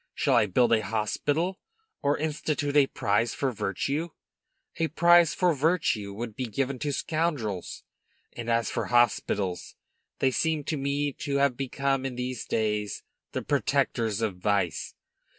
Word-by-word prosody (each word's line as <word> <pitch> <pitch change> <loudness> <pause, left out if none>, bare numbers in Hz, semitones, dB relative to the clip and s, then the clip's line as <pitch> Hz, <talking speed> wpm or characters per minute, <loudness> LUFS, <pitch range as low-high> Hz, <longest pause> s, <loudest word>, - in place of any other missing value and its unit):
Shall 140 - +1
I 115 -4 +4
build 115 +5 +3
a 110 - +4
hospital, 145 - -1 0.4
or 145 +1 +2
institute 150 -1 -2
a 145 -2 +6
prize 115 +1 0
for 135 -2 0
virtue? 140 - -2 0.7
A 165 - +1
prize 170 +1 +5
for 180 -2 +3
virtue 140 - +1
would 110 +2 -6
be 130 - -3
given 130 +3 -2
to 145 -1 -1
scoundrels; 140 - -2 0.5
and 120 -1 -6
as 115 -1 +1
for - - -2
hospitals, 105 -6 +1 0.4
they 130 - +2
seem 160 +2 0
to 155 - -2
me 140 +1 -1
to 140 -2 -2
have 140 -2 +3
become 135 +1 -1
in 135 -2 -3
these 125 -1 -4
days 105 -2 -1 0.3
the - - -2
protectors 110 -2 0
of 105 -5 -1
vice. 100 -3 -1
130 Hz, 150 wpm, -27 LUFS, 110-145 Hz, 0.7 s, a